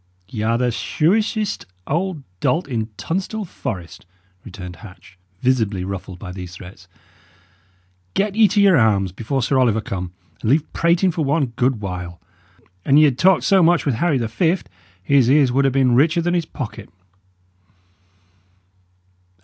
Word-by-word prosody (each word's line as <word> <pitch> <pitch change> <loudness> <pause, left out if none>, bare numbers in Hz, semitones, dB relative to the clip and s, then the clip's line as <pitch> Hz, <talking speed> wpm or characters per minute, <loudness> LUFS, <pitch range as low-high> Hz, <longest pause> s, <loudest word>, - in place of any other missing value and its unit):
"Y' 110 - -5
are 115 +2 +1
the 125 0 +1
shrewishest 210 - 0 0.2
old 170 0 -2 0.2
dolt 165 - 0
in 115 -4 -3
Tunstall 190 - -3
Forest," 90 - -7 0.4
returned 90 -2 -9
Hatch, 95 +1 -14 0.3
visibly 110 -7 +1
ruffled 95 -1 -6
by 90 0 -8
these 90 -1 -8
threats. 90 0 -13 1.3
"Get 200 0 0
ye 220 -1 +6
to 205 +1 0
your 195 -4 +5
arms 100 -5 +2
before 120 +7 -3
Sir 130 +2 +1
Oliver 115 -4 +3
come, 90 -4 -5 0.3
and 110 - -1
leave 150 +4 +1
prating 170 +2 +2
for 160 -1 -2
one 140 -4 0
good 125 -3 0
while. 90 -3 -6 0.6
An 140 - +4
ye 155 - +7
had 140 -4 +2
talked 190 0 +4
so 195 -1 +4
much 170 +1 +3
with 140 - +1
Harry 150 +5 +1
the 115 -2 -1
Fift, 165 - 0 0.3
his 130 +2 +3
ears 140 -2 +4
would 135 +2 +2
ha' 135 - +3
been 130 -2 +2
richer 160 +7 +3
than 175 +1 0
his 170 -2 0
pocket." 115 - -7
130 Hz, 155 wpm, -20 LUFS, 100-170 Hz, 1.3 s, ye